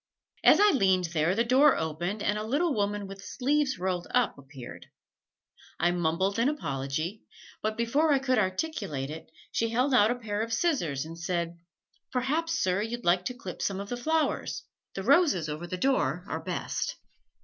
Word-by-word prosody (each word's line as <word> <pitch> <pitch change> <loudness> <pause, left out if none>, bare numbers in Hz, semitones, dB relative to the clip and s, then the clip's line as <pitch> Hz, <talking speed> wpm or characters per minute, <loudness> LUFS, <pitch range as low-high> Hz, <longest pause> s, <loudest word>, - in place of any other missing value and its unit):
As - - +7
I 415 0 +6
leaned 190 - +2
there 165 +3 +2
the 230 - +3
door 265 +5 +5
opened 175 +6 -3
and 210 - +1
a - - -3
little 290 +8 +1
woman 205 -1 -1
with 195 0 -9
sleeves 275 +2 0
rolled 180 -1 -2
up 250 -3 +2
appeared. 135 -3 -11 0.9
I 175 - +3
mumbled 175 +4 0
an 240 +4 +3
apology, 155 - -3 0.4
but 215 0 -2
before 280 +7 +2
I 280 - +5
could 260 -2 +1
articulate 185 - -2
it, 160 +1 -9 0.2
she 230 - 0
held 250 +4 +1
out 220 -4 +6
a 245 - +1
pair 215 -4 -3
of 225 +1 -2
scissors 195 - 0
and 165 +1 -9
said, 170 -1 -2 0.5
"Perhaps, 300 +6 0
sir, 185 - +1
you'd 235 +2 -4
like 180 +1 +3
to 250 - -3
clip 190 -7 -8
some 195 -1 -1
of 200 0 -6
the 245 - -2
flowers 315 +6 -1 0.3
the - - -4
roses 285 - +4
over 155 +3 -5
the 185 - -4
door 265 +7 +1
are - - -3
best!" - - -3
205 Hz, 180 wpm, -28 LUFS, 175-255 Hz, 0.9 s, As